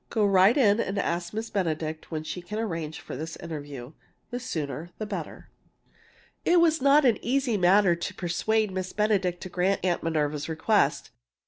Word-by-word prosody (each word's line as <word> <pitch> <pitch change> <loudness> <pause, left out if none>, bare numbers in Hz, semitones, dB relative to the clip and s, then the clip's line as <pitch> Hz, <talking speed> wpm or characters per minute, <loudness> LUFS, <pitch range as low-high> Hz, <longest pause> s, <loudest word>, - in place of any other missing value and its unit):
Go 215 -3 +1
right 195 +5 +5
in 215 -5 +4
and 200 -3 -2
ask 170 -2 -1
Miss 220 +1 -5
Benedict 160 -4 -2
when 155 -2 -4
she 180 +3 -5
can 210 +5 -6
arrange 165 -8 -3
for - - -8
this 160 +4 -5
interview 145 -5 -7 0.4
the 245 - -3
sooner, 165 - -4
the 215 - -4
better!" 195 -6 -7 0.9
It 350 0 +4
was 325 -3 +3
not 280 +2 +5
an 240 -4 +3
easy 255 -1 +1
matter 185 -1 +4
to 170 - -5
persuade 210 +4 0
Miss 185 0 -4
Benedict 195 -4 +1
to 185 - -6
grant 185 +2 0
Aunt 175 -2 +1
Minerva's 150 -2 -1
request. 165 +7 +1
185 Hz, 175 wpm, -27 LUFS, 165-215 Hz, 0.9 s, right